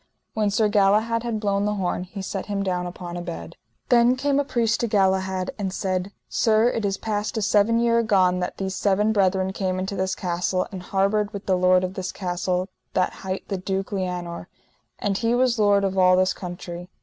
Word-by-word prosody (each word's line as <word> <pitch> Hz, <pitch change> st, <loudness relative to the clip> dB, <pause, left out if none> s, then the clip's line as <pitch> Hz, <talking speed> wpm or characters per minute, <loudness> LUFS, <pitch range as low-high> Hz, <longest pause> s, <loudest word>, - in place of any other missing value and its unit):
When 215 Hz, -2 st, +1 dB
Sir 215 Hz, +2 st, +2 dB
Galahad 210 Hz, +3 st, +3 dB
had 230 Hz, -2 st, -2 dB
blown 200 Hz, -1 st, 0 dB
the 210 Hz, 0 st, 0 dB
horn 180 Hz, -2 st, -2 dB
he 195 Hz, +1 st, -7 dB
set 190 Hz, 0 st, -4 dB
him 200 Hz, -1 st, -1 dB
down 180 Hz, -2 st, -1 dB
upon 175 Hz, 0 st, -7 dB
a -, -, -4 dB
bed. 85 Hz, -, -7 dB, 0.3 s
Then 240 Hz, 0 st, +5 dB
came 280 Hz, +1 st, +1 dB
a -, -, +2 dB
priest 235 Hz, -4 st, 0 dB
to 235 Hz, -, 0 dB
Galahad, 190 Hz, -2 st, +1 dB
and 195 Hz, -2 st, -2 dB
said: 185 Hz, 0 st, -2 dB, 0.2 s
Sir, 220 Hz, +1 st, +3 dB
it 225 Hz, -3 st, -2 dB
is 195 Hz, -1 st, 0 dB
past 210 Hz, +1 st, -2 dB
a -, -, 0 dB
seven 215 Hz, +2 st, +3 dB
year 235 Hz, 0 st, +3 dB
agone 185 Hz, -5 st, +3 dB
that 180 Hz, -, -3 dB
these 190 Hz, -1 st, -3 dB
seven 210 Hz, +2 st, +2 dB
brethren 190 Hz, -2 st, +1 dB
came 185 Hz, -2 st, -1 dB
into 190 Hz, +2 st, -3 dB
this 190 Hz, 0 st, -1 dB
castle, 180 Hz, +1 st, -1 dB
and 190 Hz, -2 st, -6 dB
harboured 200 Hz, +3 st, 0 dB
with 200 Hz, 0 st, -6 dB
the 190 Hz, -, +2 dB
lord 185 Hz, 0 st, +4 dB
of 185 Hz, 0 st, -3 dB
this 190 Hz, -1 st, -4 dB
castle 180 Hz, 0 st, -2 dB, 0.3 s
that 185 Hz, -, +1 dB
hight 190 Hz, 0 st, -4 dB
the 195 Hz, -, -1 dB
Duke 190 Hz, +2 st, -3 dB
Lianour, 180 Hz, -3 st, -4 dB, 0.5 s
and 200 Hz, -1 st, -1 dB
he 230 Hz, +1 st, +1 dB
was 250 Hz, -2 st, +2 dB
lord 205 Hz, -1 st, +4 dB
of 195 Hz, -1 st, 0 dB
all 185 Hz, -1 st, +5 dB
this 185 Hz, 0 st, +3 dB
country. 175 Hz, -1 st, -7 dB
195 Hz, 210 wpm, -24 LUFS, 185-210 Hz, 0.5 s, Then